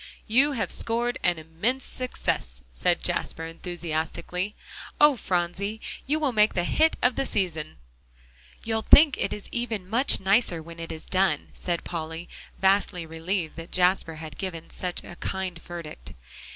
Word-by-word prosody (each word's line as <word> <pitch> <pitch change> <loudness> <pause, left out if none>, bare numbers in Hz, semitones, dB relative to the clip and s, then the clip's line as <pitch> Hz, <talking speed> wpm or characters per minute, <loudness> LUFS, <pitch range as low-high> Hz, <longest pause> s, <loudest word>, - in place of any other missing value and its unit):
"You 265 +6 +4
have 230 - -1
scored 240 +2 -1
an 175 -1 +3
immense 175 +12 -2
success," - - -3
said - - +1
Jasper 165 - -1
enthusiastically. 170 +3 -3 0.4
"Oh, 295 -1 +7
Phronsie! 190 +1 -1 0.3
you 305 +3 +2
will 295 -4 +1
make 215 -2 +4
the 175 - +2
hit 320 - +3
of 250 0 +4
the 275 - +1
season." 165 - -2 0.9
"You'll 220 0 0
think 290 +4 +7
it - - 0
is 210 - -5
even 225 -6 -2
much 240 +7 +3
nicer 195 -2 +3
when 165 +1 -10
it 165 - -5
is 160 - -7
done," 190 0 +1
said 175 -2 -2
Polly, 165 0 -5 0.3
vastly 190 -2 +2
relieved 165 +1 -3
that 165 +1 -8
Jasper 180 -2 +2
had 155 -2 -9
given 170 -4 -5
such 180 -1 -4
a 175 - -10
kind 185 -3 -3
verdict. 170 -3 -8
185 Hz, 150 wpm, -27 LUFS, 165-225 Hz, 0.9 s, Oh